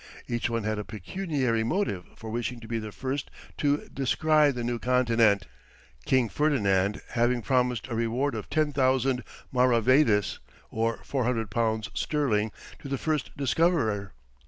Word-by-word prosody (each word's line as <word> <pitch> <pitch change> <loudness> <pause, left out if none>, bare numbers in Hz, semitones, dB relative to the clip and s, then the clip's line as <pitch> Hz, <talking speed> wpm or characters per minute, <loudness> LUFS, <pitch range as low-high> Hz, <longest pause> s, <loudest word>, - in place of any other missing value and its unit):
Each 120 0 -1
one 115 -2 -1
had 110 0 -1
a - - -3
pecuniary 125 - -2
motive 115 - -1
for 110 -1 -8
wishing 120 +1 -3
to 115 - -10
be 115 0 -2
the 110 -1 -6
first 135 +5 -4 0.3
to 145 0 +1
descry 150 +3 +3
the 125 -3 -3
New 120 0 -2
Continent, 115 -6 +3 0.6
King 130 -3 +3
Ferdinand 100 -9 +1
having 120 0 +1
promised 125 -3 +1
a 120 - -5
reward 115 +5 0
of - - -6
10,000 135 -4 +1 0.3
maravédis, 125 - +3 0.3
or 115 0 -1
400 120 -6 -1
pounds 110 0 0
sterling, 110 -8 0 0.3
to - - -9
the 135 - -1
first 155 +1 -2
discoverer. 140 - +1
120 Hz, 140 wpm, -27 LUFS, 110-140 Hz, 0.6 s, descry